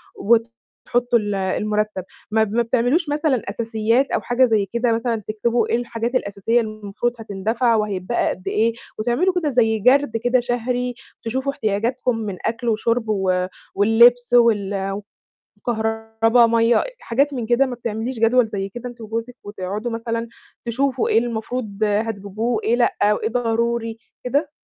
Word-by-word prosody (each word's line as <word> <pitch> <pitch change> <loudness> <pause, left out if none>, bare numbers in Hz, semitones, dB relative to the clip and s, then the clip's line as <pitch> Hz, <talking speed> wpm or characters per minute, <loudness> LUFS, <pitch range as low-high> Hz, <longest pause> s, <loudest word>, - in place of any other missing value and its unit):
وتحطّوا 235 +2 0
ال 205 -1 -2
المرتّب 210 +1 -1 0.3
ما 220 0 +3
ب 210 - -3
ما 235 - +3
بتعملوش 250 +8 +1
مثلًا 295 -4 +1
أساسيات 225 +4 0
أو - - 0
حاجة 245 +2 +3
زي 220 -4 +2
كده 235 0 +1
مثلًا 230 -1 -1
تكتبوا 230 +3 0
إيه - - +2
الحاجات 235 +1 -3
الأساسية 220 +1 +1
اللي 220 - -4
المفروض 210 +4 -2
هتندفع 225 +3 0
وهتبقى 210 0 0
قد 185 - -6
إيه، 225 +2 +2 0.3
وتعملوا 245 +12 +1
كده 305 - 0
زي 225 -4 +2
جَرد 255 +1 +3
كده 245 +2 +2
شهري 245 +1 -1 0.3
تشوفوا 260 +4 -1
احتياجاتكم 235 +2 -1
من 210 -4 -4
أكل 230 +1 -1
وشرب 230 +2 0
و 185 -3 +1 0.3
واللبس 235 +4 +5
وال 200 -4 +2 0.6
وكهربا، 225 +1 +2
مَيّة 230 +1 +3
آآ، - - +2 0.2
حاجات 280 +5 0
من 245 -4 -3
كده 240 +4 +3
ما 255 -2 -4
بتعمليش 230 +1 -4
جدول 230 +1 +4
زي 195 -2 -4
كده 240 +5 -7
أنتِ 240 -1 -13
وجوزِك 225 +2 -5
وتقعُدوا 205 +3 -4
مثلًا 230 0 -3 0.4
تشوفوا 255 +2 0
إيه 225 - +5
المفروض 225 -2 -3
هتجيبوه 215 +1 -1
إيه 235 - +2
لأ، 240 - +2 0.2
وإيه 220 +1 -2
ضروري 230 -1 -1 0.3
كده؟ 285 +4 0
230 Hz, 150 wpm, -21 LUFS, 215-245 Hz, 0.6 s, واللبس